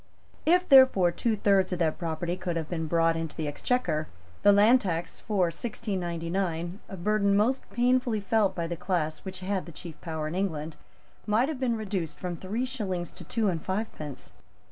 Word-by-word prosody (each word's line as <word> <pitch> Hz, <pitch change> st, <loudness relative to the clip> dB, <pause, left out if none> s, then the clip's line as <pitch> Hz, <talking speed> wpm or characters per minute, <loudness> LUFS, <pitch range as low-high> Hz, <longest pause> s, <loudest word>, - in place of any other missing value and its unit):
If, 360 Hz, +2 st, +4 dB
therefore, 260 Hz, -10 st, +7 dB
two 225 Hz, +5 st, 0 dB
thirds 200 Hz, -2 st, +3 dB
of 180 Hz, -, -1 dB
that 165 Hz, -3 st, 0 dB
property 170 Hz, 0 st, -2 dB
could 180 Hz, -2 st, -3 dB
have 160 Hz, -2 st, -2 dB
been 160 Hz, -2 st, -3 dB
brought 165 Hz, 0 st, +3 dB
into 165 Hz, -1 st, -4 dB
the 155 Hz, -, -2 dB
Exchequer, 155 Hz, -, 0 dB, 0.3 s
the 205 Hz, -, +7 dB
land 215 Hz, +5 st, +6 dB
tax 170 Hz, -3 st, -3 dB
for 210 Hz, -3 st, -1 dB
1699, 175 Hz, -3 st, -3 dB
a 195 Hz, -, -7 dB
burden 200 Hz, +2 st, +2 dB
most 250 Hz, +6 st, +1 dB
painfully 245 Hz, 0 st, +2 dB
felt 205 Hz, -1 st, +1 dB
by 170 Hz, -, -2 dB
the 170 Hz, +1 st, -3 dB
class 170 Hz, -3 st, -1 dB
which 190 Hz, -1 st, -8 dB
had 190 Hz, 0 st, -2 dB
the -, -, -8 dB
chief 165 Hz, 0 st, -10 dB
power 160 Hz, -2 st, -3 dB
in 155 Hz, -, -4 dB
England, 160 Hz, -5 st, -2 dB, 0.5 s
might 225 Hz, +6 st, +3 dB
have 300 Hz, -5 st, -4 dB
been 240 Hz, -3 st, 0 dB
reduced 195 Hz, -7 st, -3 dB
from 180 Hz, -1 st, -4 dB
three 210 Hz, +9 st, -3 dB
shillings 195 Hz, -9 st, -3 dB
to -, -, -11 dB
two 225 Hz, -3 st, 0 dB
and 170 Hz, -4 st, 0 dB
fivepence. 190 Hz, -, -5 dB
185 Hz, 185 wpm, -28 LUFS, 165-215 Hz, 0.5 s, therefore